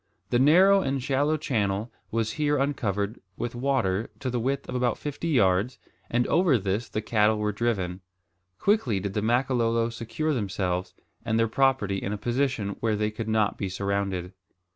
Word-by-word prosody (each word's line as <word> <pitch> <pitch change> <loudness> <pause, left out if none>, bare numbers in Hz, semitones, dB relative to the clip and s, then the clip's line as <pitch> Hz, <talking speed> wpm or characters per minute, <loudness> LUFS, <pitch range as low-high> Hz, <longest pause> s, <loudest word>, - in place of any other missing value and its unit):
The 120 - +3
narrow 185 +8 +6
and 135 -5 -1
shallow 145 +4 +1
channel 110 -6 -1 0.2
was 115 -1 -1
here 150 +1 +1
uncovered 110 -6 -1 0.2
with 120 - -3
water 120 -6 0
to 130 -3 -2
the 120 - -1
width 135 +4 -2
of - - -5
about 125 -2 +1
fifty 145 +3 -4
yards, 105 - +2 0.3
and 120 +1 +1
over 165 -6 +3
this 100 +3 -2
the 110 - -3
cattle 110 -1 +3
were 105 0 0
driven. 100 -5 -2 0.6
Quickly 165 - +2
did 95 0 -4
the 105 - 0
Makololo 115 0 +1
secure 115 +7 -2
themselves 95 -5 -2 0.3
and 110 -1 0
their 115 0 +3
property 115 -5 +1
in 95 - -3
a - - -3
position 120 -1 -1
where 110 -2 +1
they 105 0 0
could 110 +1 -5
not 110 -1 +1
be 95 - -2
surrounded. 95 -1 -2
115 Hz, 170 wpm, -26 LUFS, 100-135 Hz, 0.6 s, narrow